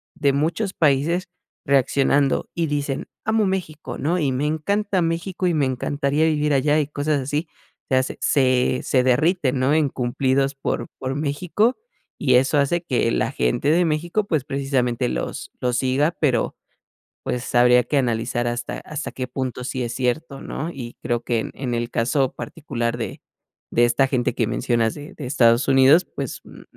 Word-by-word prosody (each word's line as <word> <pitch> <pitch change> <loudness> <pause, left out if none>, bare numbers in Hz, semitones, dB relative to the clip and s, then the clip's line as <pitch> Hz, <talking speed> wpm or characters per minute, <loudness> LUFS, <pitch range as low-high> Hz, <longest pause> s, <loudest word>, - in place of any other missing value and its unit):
de 140 - +2
muchos 170 +8 -1
países 155 +4 +2 0.4
reaccionando 140 0 +2
y 170 -1 0
dicen: 145 -2 -2 0.2
"Amo 220 0 +2
México", 180 -6 -3
¿no?, 170 +5 0
y, 145 -5 +1
"me 130 +3 -1
encanta 195 +6 0
México 170 +3 -1
y 175 - +2
me 150 -3 +2
encantaría 140 +3 0
vivir 150 -2 +1
allá", 145 +3 +3
y 150 - 0
cosas 145 0 -1
así, 145 +5 -2 0.4
se 130 - +2
hace 130 +1 -1
se 130 -2 +2
se 130 -2 +2
derriten, 135 +1 +2
¿no?, 130 +3 +2
en 155 -2 +3
cumplidos 135 +2 0
por 135 - -3
por 130 0 -3
México 170 - 0 0.4
y 130 -4 +3
eso 135 +4 +3
hace 145 +5 +2
que 125 -5 +1
la - - 0
gente 60 - 0
de 170 +3 +4
México, 170 +6 0
pues, 155 -8 0
precisamente 130 -3 0
los - - -4
los 125 -1 0
siga, 135 +5 +2
pero, 125 -7 +1 0.7
pues, 125 0 -4
habría 125 0 +5
que 145 - -1
analizar 120 -2 0
hasta 120 0 -4
hasta 150 0 -6
qué 130 -1 -5
punto 130 -1 -4
sí 130 -1 -3
es 120 0 -4
cierto, 135 +3 -2
¿no?, 160 - -4
y 120 -5 -8
creo 120 -1 -1
que 120 -1 0
en - - -3
en 125 -3 -3
el 120 0 -2
caso 130 +3 +1
particular 120 -7 -3
de 115 - -5 0.5
de 120 - +4
esta 120 +3 +3
gente 125 -3 0
que 115 - 0
mencionas 120 -1 0
de 145 0 -10
de 145 - -6
Estados 120 -2 +3
Unidos, 135 +6 +6
pues, - - -4
mm - - -13
140 Hz, 175 wpm, -22 LUFS, 125-155 Hz, 0.7 s, Unidos